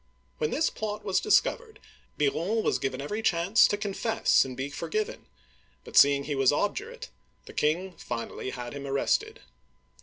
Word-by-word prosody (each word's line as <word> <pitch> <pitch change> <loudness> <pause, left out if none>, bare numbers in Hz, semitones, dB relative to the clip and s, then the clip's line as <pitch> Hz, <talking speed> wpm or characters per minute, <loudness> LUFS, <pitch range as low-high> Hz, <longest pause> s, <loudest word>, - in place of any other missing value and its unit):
When 150 - 0
this 320 - +1
plot 210 -1 -5
was 195 -2 +2
discovered, 440 +1 +1 0.4
Biron 170 +10 0
was - - +1
given 135 0 -3
every 210 +10 -3
chance 180 +2 +4
to 205 - -1
confess 210 +2 +2
and 130 -2 -8
be 135 +2 -4
forgiven, 430 - -4 0.6
but - - -12
seeing 140 0 +6
he 145 - -3
was 135 -1 +3
ob 205 +8 0
durate, 475 +4 -7 0.4
the - - -12
king 175 +5 0
finally 120 +2 -5
had 120 -2 -6
him 140 -1 -6
arrested. 135 0 0
175 Hz, 160 wpm, -28 LUFS, 140-220 Hz, 0.6 s, seeing